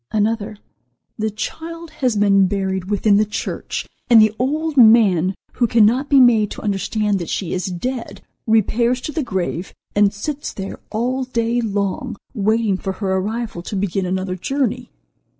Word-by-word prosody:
Another: 215 0 -1 0.6
"The 220 0 0
child 325 +10 -6
has 255 -6 -1
been 200 -2 +4
buried 190 -1 -2
within 205 0 +3
the 210 - +4
church, 210 0 -4 0.2
and 235 -2 +8
the 215 0 +5
old 305 +4 -1
man, 210 - +5 0.2
who 240 - +1
cannot 235 +5 +3
be 280 - +6
made 225 -5 +5
to - - -7
understand 205 0 0
that 170 - -5
she 185 - -2
is 185 +2 -2
dead 200 +2 -5 0.2
repairs 235 +3 +2
to 305 - -4
the 310 - -2
grave 190 - -3 0.2
and 205 -1 +4
sits 285 +8 -5
there 195 -1 -6
all 255 +4 -1
day 235 -1 0
long, 205 +2 -2 0.2
waiting 215 -2 +1
for 190 0 -4
her 190 -1 -2
arrival 215 0 -2
to 190 - -6
begin 190 -1 -1
another 185 0 -2
journey. 250 +3 -2
215 Hz, 160 wpm, -20 LUFS, 195-245 Hz, 0.6 s, and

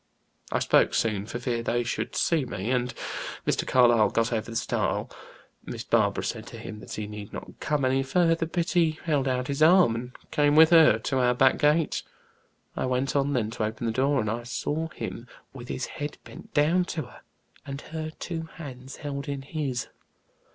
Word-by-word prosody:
I - - +1
spoke - - +3
soon, 105 -3 0
for 120 - -4
fear 120 -1 -2
they 120 +1 0
should 120 - -3
see 165 -4 +2
me, 115 -2 -3
and 125 -1 +1 0.5
Mr. - - 0
Carlyle 120 -4 +5
got 115 +1 0
over 110 0 -2
the 115 - -7
stile. 115 - -1 0.5
Miss - - -6
Barbara - - +2
said - - -4
to - - -9
him 105 - -8
that - - -9
he 105 - -4
need 105 -1 -8
not - - -9
come 150 -3 0
any 130 +1 +2
further, 165 +4 +2
but 170 +1 -1
he 165 -3 +2
held 145 -5 +1
out 125 -1 0
his 140 +1 -3
arm, 170 -5 +6
and 125 +2 -5 0.2
came 145 0 +3
with 160 +1 +8
her 160 -9 +7
to 130 +4 -1
our 125 -1 +3
back 130 +1 +4
gate. 150 +2 +2 0.7
I - - -1
went 130 +2 0
on 140 0 +2
then 115 -4 0
to 115 - -3
open 110 +2 -3
the 115 - +1
door, 135 +3 +2
and 110 - -1
I 115 +2 -2
saw 150 +6 -2
him 120 -6 -7 0.3
with 125 -2 -9
his 130 - -3
head 145 0 -6
bent - - -12
down 165 +5 +3
to 160 -3 -3
her, 125 - -14 0.4
and 140 -1 -6
her 155 -1 -3
two 160 0 -5
hands 130 -4 -8
held 140 -2 -5
in 140 -1 -4
his. 140 -4 -3
135 Hz, 200 wpm, -27 LUFS, 120-155 Hz, 0.7 s, with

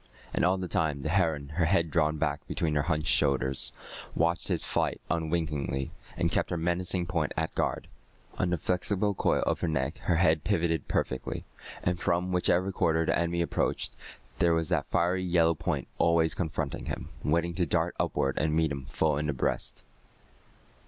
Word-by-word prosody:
And - - +1
all 90 +2 +3
the 95 -1 -3
time 75 -4 0
the 80 - -1
heron, 80 -5 +1
her 80 +2 +1
head 85 -2 +2
drawn 75 0 +2
back 75 -1 -2
between 80 -2 -1
her 75 - +2
hunched 75 0 +1
shoulders, 65 -1 +2 0.4
watched 85 +1 +1
his - - 0
flight - - 0
unwinkingly, 75 -5 -1 0.3
and - - +1
kept - - +1
her 90 - -1
menacing 85 +2 0
point 85 -4 -1
at 80 0 -1
guard. - - -1 0.5
On 90 - +2
the 90 - +1
flexible 95 +5 0
coil - - +1
of - - 0
her - - +1
neck 75 -1 -1
her 85 - +1
head 80 -3 +3
pivoted 80 -1 0
perfectly, 65 - -2 0.4
and 90 0 0
from 90 +2 0
whichever 90 +1 +2
quarter 80 -3 +2
the - - +2
enemy 85 0 +1
approached, - - -1 0.4
there 85 -1 +4
was 80 -1 0
that - - +1
fiery 90 +2 +1
yellow 85 -2 +3
point 80 - -2
always 85 -1 +3
confronting 80 -5 -3
him, - - -4
waiting 85 +2 +1
to - - 0
dart - - +1
upward 70 0 0
and 75 0 +1
meet 80 -2 +2
him 70 -2 -4
full 75 0 +1
in 75 - -1
the 75 - 0
breast. 65 - -2
80 Hz, 180 wpm, -29 LUFS, 75-85 Hz, 0.5 s, there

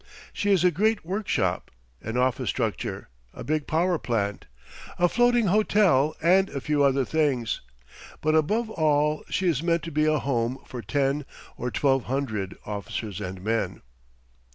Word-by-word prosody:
She 205 - -1
is 190 -4 +4
a 180 - +5
great 215 +4 +1
workshop, 175 - -1 0.3
an 110 +3 -4
office 125 0 +1
structure, - - -3 0.3
a - - -7
big 155 -1 -1
power 170 +1 +1
plant, 105 -4 -2 0.5
a 175 - +4
floating 240 +3 +3
hotel 190 -7 +3
and 190 +3 +4
a 140 - -4
few 145 +1 +1
other 135 -1 +3
things. 140 -7 0 0.6
But 155 0 +1
above 215 +9 +1
all 150 -3 +1
she 185 - 0
is 155 -5 +1
meant 170 -1 +1
to 165 - -6
be 155 +1 +2
a 155 0 +3
home 125 -2 -1
for 125 - -7
ten 140 +6 0 0.3
or 125 - -3
twelve 135 0 +1
hundred 110 -8 -3
officers 105 -1 -5
and 95 0 -6
men. 115 +2 -1
150 Hz, 155 wpm, -26 LUFS, 125-175 Hz, 0.6 s, a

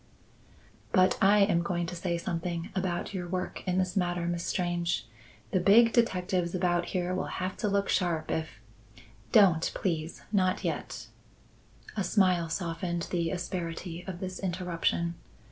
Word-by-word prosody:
"But 185 -3 +4
I 205 +2 +6
am 195 -4 +4
going 175 0 -1
to 175 +1 -5
say 175 0 -1
something 170 0 -3
about 185 0 -2
your 180 -2 -3
work 185 +1 -3
in 180 0 +1
this 185 -1 0
matter, 175 -2 0
Miss 170 0 -2
Strange. 175 -6 -1 0.5
The 185 - +2
big 225 +5 +6
detectives 185 -6 +1
about 175 -1 +1
here 180 0 -1
will 185 - -2
have 185 0 -2
to 215 - -1
look 200 0 +1
sharp 165 -4 0
if 155 -9 -3 0.4
" 110 +3 -23
"Don't, 170 -5 +3
please! 165 -3 -2
Not 185 -3 +2
yet." - - -3 0.9
A 200 - 0
smile 185 -4 +2
softened 170 0 -3
the 170 -2 0
asperity 175 -1 -4
of 180 -2 -5
this 185 -1 -4
interruption. 175 -2 -1
180 Hz, 150 wpm, -29 LUFS, 170-185 Hz, 0.9 s, I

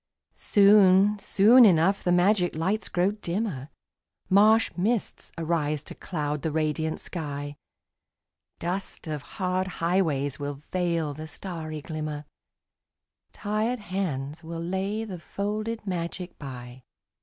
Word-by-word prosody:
Soon, 200 0 +5
soon 225 +6 +6
enough 190 -1 +4
the 175 - +1
magic 180 0 +3
lights 190 +7 -1
grow 180 +2 +2
dimmer, 180 - -3 0.6
Marsh 215 +3 +5
mists 215 +5 -2
arise 155 -3 -1
to - - -8
cloud 150 -4 -3
the 160 - -1
radiant 155 +1 -1
sky, 145 -4 -5 1.0
Dust 185 +3 -4
of 155 -3 -4
hard 185 +5 -2
highways 165 -7 0
will 145 0 -5
veil 170 -4 0
the 155 +2 -8
starry 155 -2 -6
glimmer, 155 -2 -5 1.1
Tired 215 +4 -1
hands 170 - -4
will 165 +1 -6
lay 190 +5 -2
the 185 -5 -7
folded 215 +6 -4
magic 180 -1 -4
by. 125 -2 -8
175 Hz, 115 wpm, -26 LUFS, 155-200 Hz, 1.1 s, soon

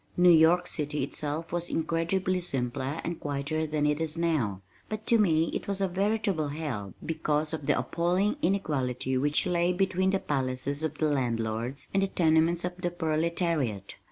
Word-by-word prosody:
New 180 0 +7
York 170 +2 +5
City 150 -4 -1
itself 150 +3 -3
was 175 0 -2
incredibly 170 +3 0
simpler 135 -2 -2
and 170 0 -4
quieter 145 +2 -2
than 150 -1 0
it 150 +1 +1
is 160 0 -2
now, 130 - 0 0.3
but 215 0 -5
to 230 - +4
me 165 -5 +3
it - - -4
was 200 -1 -1
a 195 - +2
veritable 195 -3 0
hell 140 -10 -4
because 155 -1 -1
of 155 -3 -5
the - - +3
appalling 180 +6 +1
inequality 130 - 0
which 145 +3 +2
lay 175 0 +2
between 190 0 +1
the 195 - +2
palaces 135 0 -2
of 155 -1 -3
the 155 - +1
landlords 120 -2 -1
and 195 - +3
the 195 - +2
tenements 165 0 +2
of 180 0 -3
the 175 -1 -1
proletariat. 160 - -1
160 Hz, 170 wpm, -28 LUFS, 145-175 Hz, 0.3 s, New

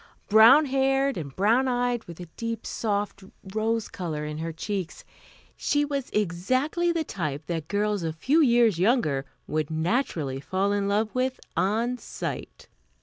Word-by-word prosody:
Brown 230 +8 +8
haired 270 0 +1
and 140 -5 -6
brown 230 +7 +3
eyed, 245 -1 0
with 170 0 -10
a 175 - -6
deep, 230 0 -4
soft 205 -2 -2 0.3
rose 220 0 0
color 155 -5 -4
in 150 0 -5
her 165 +1 -3
cheeks, 185 +1 -4 0.5
she 290 0 +1
was 280 -2 -3
exactly 255 - 0
the 335 -1 0
type 155 - -4
that 165 -3 -3
girls 205 +1 0
a 165 -1 -2
few 260 - +2
years 235 - +4
younger 180 - +2 0.2
would 155 -1 -2
naturally 160 - -1
fall 190 +6 0
in 200 -1 0
love 210 +2 0
with 255 0 -1 0.2
on 230 +6 0
sight. - - -6
210 Hz, 150 wpm, -26 LUFS, 170-255 Hz, 0.5 s, Brown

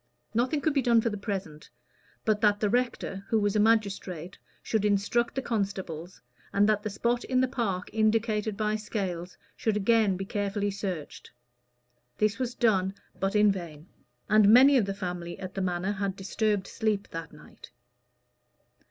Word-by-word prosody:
Nothing 255 +6 +1
could 315 - +1
be 280 - +2
done 235 -2 +4
for 230 0 0
the - - -3
present, 195 -7 -5 0.6
but 215 -1 +1
that 205 -2 +3
the 210 -2 +1
rector, 240 -5 -1
who 225 - +3
was 205 -1 0
a - - +3
magistrate, 200 -5 0 0.2
should 220 -2 0
instruct 210 +4 +1
the 265 - -2
constables, 190 -6 -3 0.3
and 200 +1 +3
that 210 -1 +2
the 215 - -3
spot 235 +4 -1
in 255 -1 +1
the 260 - +3
park 225 -8 -2
indicated 215 -1 +1
by 215 0 0
Scales 185 -5 -4 0.2
should 220 -2 0
again 210 -2 +3
be 195 - -4
carefully 205 0 -1
searched. 190 -6 -5 0.9
This 215 +3 +1
was 250 -1 -2
done, 195 -4 +2 0.2
but 195 +2 -1
in 210 -1 +5
vain; 170 -4 -7 0.4
and 215 -1 +5
many 265 +5 +8
of 240 -6 +4
the 195 0 -3
family 175 -3 -5
at 190 -1 -7
the 195 - -3
Manor 180 +1 -1
had 200 -2 -2
disturbed 200 0 -1
sleep 215 -3 -2
that 165 -1 -6
night. - - -15
205 Hz, 170 wpm, -28 LUFS, 190-225 Hz, 0.9 s, many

